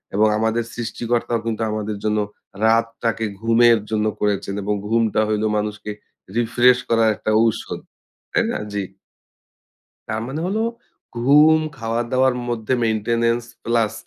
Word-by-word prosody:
এবং 110 +1 +4
আমাদের 110 +1 +1
সৃষ্টিকর্তাও 120 0 -2
কিন্তু 115 -1 -2
আমাদের 105 -1 -3
জন্য 105 0 +1 0.5
রাতটাকে 115 0 +1 0.2
ঘুমের 115 0 +5
জন্য 110 -1 +1 0.2
করেছেন 100 -1 0
এবং 105 +1 0
ঘুমটা 115 -1 +2
হইল 105 0 0
মানুষকে 105 0 -3 0.5
রিফ্রেশ 120 +2 +4
করার 115 -1 +4
একটা 110 - -2
ঔষধ 115 -2 -1 0.5
তাই - - +2
না? - - -2 0.2
জি। 100 - -1 1.3
তার 110 0 -2
মানে 135 +4 -4
হলো 210 +4 0 0.6
ঘুম, 150 +6 +6 0.2
খাওয়া 115 +1 -1
দাওয়ার 130 0 +3
মধ্যে 120 +1 -1
মেইনটেন্যান্স 115 +2 +1 0.2
প্লাস 115 -3 +1
115 Hz, 130 wpm, -21 LUFS, 110-120 Hz, 1.3 s, ঘুম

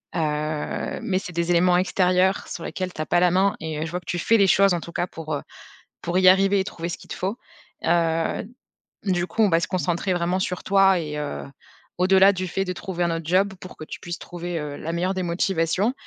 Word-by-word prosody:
Heu, - - 0 0.8
mais, 185 -2 0
c'est 180 -1 -8
des 170 +1 0
éléments 175 +1 +4
extérieurs 185 +1 +2
sur 170 - -6
lesquels 185 +2 -4
tu - - -5
as - - -2
pas 175 - +2
la 180 0 +4
main 195 +3 +2
et 155 -1 -4
je 160 - -6
vois 180 - -2
que 180 - -24
tu 175 - -2
fais 230 +6 +3
les 200 -2 +4
choses 195 0 +5
en 175 - 0
tout 170 - -9
cas - - 0
pour, 160 -3 -6
heu, 145 - -4 0.6
pour 175 +1 -2
y 185 -1 +6
arriver 195 +1 +5
et - - -1
trouver 170 -4 -5
ce 170 - -4
qu'il - - -16
te - - -3
faut. 195 +5 -2 0.5
Heu, 165 -1 +1 0.6
du 180 -3 0
coup, 225 - -1
on 210 - +5
va 165 -1 +3
se 170 - -2
concentrer 180 0 -1
vraiment 175 +1 0
sur 180 -1 -3
toi 195 -1 +4
et 150 -2 -4
heu, 150 -1 -4 0.5
au-delà 190 +2 +5
du 185 -1 -3
fait 195 +3 -2
de 185 - -3
trouver 180 -1 -3
un 170 - +1
autre 165 -1 -5
job 190 +4 +2
pour 185 - -10
que - - -8
tu - - -8
puisses 175 0 -6
trouver, 175 -1 -5
heu, 150 -1 -5
la 165 - -4
meilleure 180 +3 0
des 185 - -1
motivations. 180 +4 0
180 Hz, 245 wpm, -24 LUFS, 170-190 Hz, 0.8 s, y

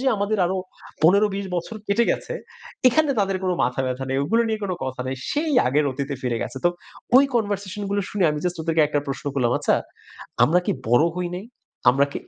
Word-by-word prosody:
যে 265 - -3
আমাদের 205 +2 0
আরো 190 +2 -1 0.5
১৫-২০ 200 +3 +3
বছর 175 +6 -4
কেটে 210 +4 +3
গেছে, - - -3 0.5
এখানে 300 +3 +2
তাদের 195 -1 +1
কোনো 185 -1 +1
মাথাব্যথা 130 +1 -1
নেই। 135 - +1
ওগুলো 230 +9 +2
নিয়ে 220 -1 -1
কোন 185 - -2
কথা 130 -1 -4
নেই। 130 0 -3
সেই 305 +1 0
আগের 145 +4 +2
অতীতে 140 +1 -3
ফিরে 120 -2 -1
গেছে। - - -6
তো - - +7 0.5
ওই 275 - +8
কনভারসেশন 205 -3 -2 0.2
গুলো 200 - +1
শুনে 200 -3 0
আমি 150 - -2
জাস্ট 180 -1 -1
ওদেরকে 165 -1 +2
একটা 150 0 0
প্রশ্ন 135 - -5
করলাম, 125 -3 +1
"আচ্ছা - - +2 0.7
আমরা 175 +8 +3
কি - - +2 0.2
বড় 120 +7 +5
হই 180 -1 -2
নাই? 190 - -7 0.5
আমরা 140 +2 +3
কি - - -3
180 Hz, 200 wpm, -23 LUFS, 135-205 Hz, 0.7 s, ওই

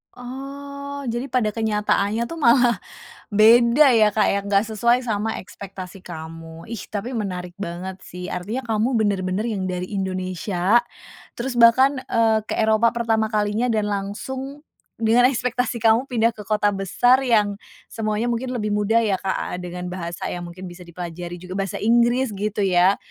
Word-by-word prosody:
Oh 280 +2 -7
jadi 240 +3 -3
pada 245 -5 0
kenyataannya 210 0 0
tuh 330 - -6
malah 240 -5 +4 0.5
beda 235 +6 +6
ya, 220 -3 +5
Kak, 215 - +3
ya 200 - +1
nggak 200 0 +2
sesuai 235 +4 +2
sama 220 -1 -1
ekspektasi 190 0 -9
kamu. 165 -1 -9
Ih, 230 - -4
tapi 215 +4 -4
menarik 180 -6 -4
banget 185 0 -5
sih, 180 0 -7
artinya 215 +9 -4
kamu 225 +4 +1
bener-bener 200 -2 0
yang 200 -5 -2
dari 180 +1 -4
Indonesia 185 +1 0 0.6
terus 245 +1 -4
bahkan, 260 +4 +6
eee, 225 -1 +3
ke - - -2
Eropa 220 +1 +3
pertama 225 -2 +1
kalinya 210 +2 0
dan 215 -2 0
langsung 260 +8 -5 0.4
dengan 230 +2 +4
ekspektasi 250 -1 -1
kamu 225 +3 +4
pindah 230 -2 +2
ke - - -9
kota 210 -1 +2
besar 245 +7 +3
yang 210 -4 +3 0.3
semuanya 215 0 -2
mungkin 240 +2 -2
lebih 215 -4 -2
mudah 210 +2 +2
ya, 215 -3 +1
Kak, 190 -1 -2
dengan 180 0 -6
bahasa 170 -2 -5
yang 175 - -5
mungkin 185 +2 -9
bisa 175 +1 -12
dipelajari 175 0 -7
juga 180 +1 -8
bahasa 195 -1 -2
Inggris 240 +2 +3
gitu 210 +1 -2
ya. 185 +1 +4
215 Hz, 155 wpm, -22 LUFS, 190-240 Hz, 0.6 s, beda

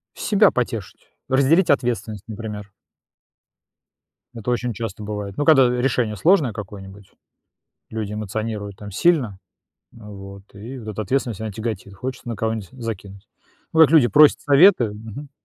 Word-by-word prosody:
Себя 210 -1 +3
потешить, 115 -6 -4 0.2
разделить 140 +7 +3
ответственность, 115 -6 0
например. 105 -2 -7 1.6
Это 115 +1 -4
очень 120 -1 -1
часто 110 -1 -6
бывает, 105 -2 -6
ну, 145 - 0
когда 135 -6 +6
решение 125 -3 0
сложное 145 - +3
какое-нибудь, 100 -1 -10 0.8
люди 110 -2 -4
эмоционируют 105 -1 -4
там 105 0 -9
сильно, 130 - +1 0.6
вот, 100 -3 -11
и 115 +7 -9
вот 110 -2 -8
эта 110 +1 -4
ответственность, 120 -1 -1
она 110 -1 -4
тяготит. 105 -2 -5
Хочется 125 +6 -7
на 115 - -3
кого-нибудь 110 -4 -3
закинуть. 105 -5 -8 0.4
Ну, 160 - 0
как 160 - +8
люди 150 -7 +6
просят 150 +2 +5
советы, 145 - +5
мгм. 110 +7 -9
110 Hz, 135 wpm, -21 LUFS, 105-130 Hz, 1.6 s, как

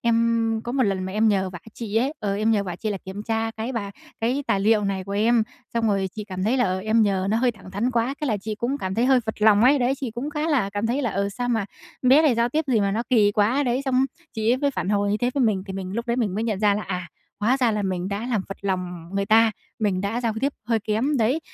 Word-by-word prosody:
em 230 -1 +2
có 240 - -4
một 265 0 +2
lần 195 -4 0
mà 190 - -5
em 220 +1 +3
nhờ 190 -2 +1
vả 175 - -8 0.2
chị 220 -2 -4
ấy, 265 +6 +2
ờ, 200 -1 -1
em 215 +2 +1
nhờ 210 -3 +2
vả 175 -2 -5
chị 215 +1 -3
là 195 - -3
kiểm 190 +2 -6
tra 225 0 -1
cái 225 +3 -5
bà 205 -5 -3 0.3
cái 255 +5 0
tài 195 - +1
liệu 210 0 +3
này 195 -1 -2
của 200 - -6
em, 225 +3 +3 0.3
xong 230 -1 +1
rồi 195 -2 +1
chị 210 - -4
cảm 185 -2 -4
thấy 235 +5 +2
là, 250 - +3
ờ, 185 0 0
em 220 +2 +2
nhờ 195 -2 +1
nó 220 - +2
hơi 245 0 +2
thẳng 200 -3 -14
thắn 215 +6 -1
quá, 240 +3 0
thế 300 - -1
là 215 -4 +1
chị 215 +2 -5
cũng 250 +6 -2
cảm 190 0 -3
thấy - - -9
thấy 240 +2 +2
hơi 260 -2 +5
phật 220 -1 -5
lòng 215 0 +6
ấy, 280 +2 +5
đấy. 250 +1 +2
Chị 260 -4 -3
cũng 245 +7 -4
khá 300 +2 -2
là 240 -10 +1
cảm 205 +3 -2
thấy 265 +5 0
là, 240 - 0
ừ, 200 +1 -1
sao 245 +5 -4
mà 225 -4 +1 0.4
bé 265 +5 +6
này 290 -6 +4
giao 235 +1 +2
tiếp 310 +4 0
gì 240 -6 +2
mà 200 0 +1
nó 225 +3 0
kỳ 210 -4 +4
quá 220 +8 +2
đấy. 250 +1 0
Xong 260 0 +2 0.3
chị 220 0 0
ấy - - +2
mới 285 +1 +1
phản 190 - -3
hồi 205 0 +1
như 205 - +2
thế 245 +1 +1
với 275 - +2
mình, 200 -4 +1
thì 195 - -5
mình 190 -1 -5
lúc 235 +2 -3
đấy 235 - 0
mình 215 -7 0
mới 220 - -1
nhận 215 -4 -1
ra 205 -1 +4
là, 210 - -2
à, 180 -3 -4 0.3
hóa 240 +6 +3
ra 245 -4 +2
là 210 -1 -1
mình 185 -1 -2
đã 205 +4 -3
làm 215 -4 +1
phật 195 - -6
lòng 180 -3 -3
người 200 0 -1
ta, 225 +1 +5 0.3
mình 200 -5 0
đã 205 +5 -2
giao 230 -2 0
tiếp 280 +1 +1
hơi 230 -1 +2
kém 225 +8 0
đấy. 255 +7 +1
220 Hz, 305 wpm, -24 LUFS, 200-245 Hz, 0.4 s, lòng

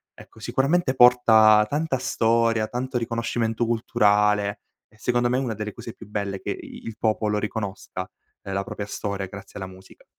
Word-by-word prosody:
ecco, - - -16
sicuramente 140 +1 +1
porta 110 -4 +6
tanta 150 -2 0
storia 115 -3 +1
tanto 125 +2 -3
riconoscimento 115 0 -1
culturale 105 -3 +2 0.3
e - - -27
secondo 120 +1 +1
me 125 +1 +1
è - - +1
una 120 -4 -3
delle 105 0 -5
cose 115 - -9
più 110 - -13
belle 100 -2 -3
che - - -4
i - - -9
il 115 -1 -7
popolo 105 -1 0
riconosca, 105 -2 -5 0.4
la 100 0 -2
propria 100 +1 -6
storia 100 -1 -4
grazie 100 +1 -11
alla 95 - -4
musica. 95 0 -16
110 Hz, 165 wpm, -24 LUFS, 105-120 Hz, 0.4 s, porta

